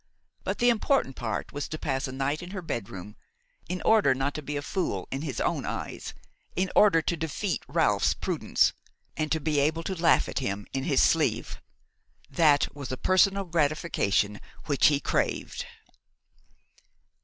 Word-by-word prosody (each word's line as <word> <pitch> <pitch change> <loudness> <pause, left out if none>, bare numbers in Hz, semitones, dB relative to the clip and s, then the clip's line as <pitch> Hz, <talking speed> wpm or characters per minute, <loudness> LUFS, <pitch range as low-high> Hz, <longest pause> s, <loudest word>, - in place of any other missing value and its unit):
But - - -2
the 245 -1 +4
important 230 - +1
point 115 -2 -4
was 145 0 -3
to 155 - -5
pass 135 -2 -2
a - - -6
night 135 +4 -2
in 175 - -8
her 190 -1 -6
bedroom, 105 - -6 0.5
in 180 0 -3
order 205 -12 +5
not 135 +2 -1
to 150 - -5
be 145 0 -4
a 145 - -4
fool 185 +3 -2
in 135 - -3
his 145 -6 -4
own - - 0
eyes, - - -5 0.4
in 185 0 0
order 185 -6 +5
to 170 - 0
defeat 160 +1 -2
Ralph's - - +2
prudence, - - +1 0.4
and 155 -1 -2
to 160 - +2
be 150 -1 0
able 160 +4 +1
to 190 - -3
laugh 170 -2 +3
at - - -2
him 100 -6 -3
in 135 0 -2
his - - +3
sleeve. - - +1 0.7
That 145 -1 +3
was 140 -4 -6
a 130 - -3
personal 195 - +3
gratification 150 - 0 0.2
which 145 -3 +4
he 145 -2 +3
craved. - - -2
150 Hz, 165 wpm, -27 LUFS, 135-175 Hz, 0.7 s, order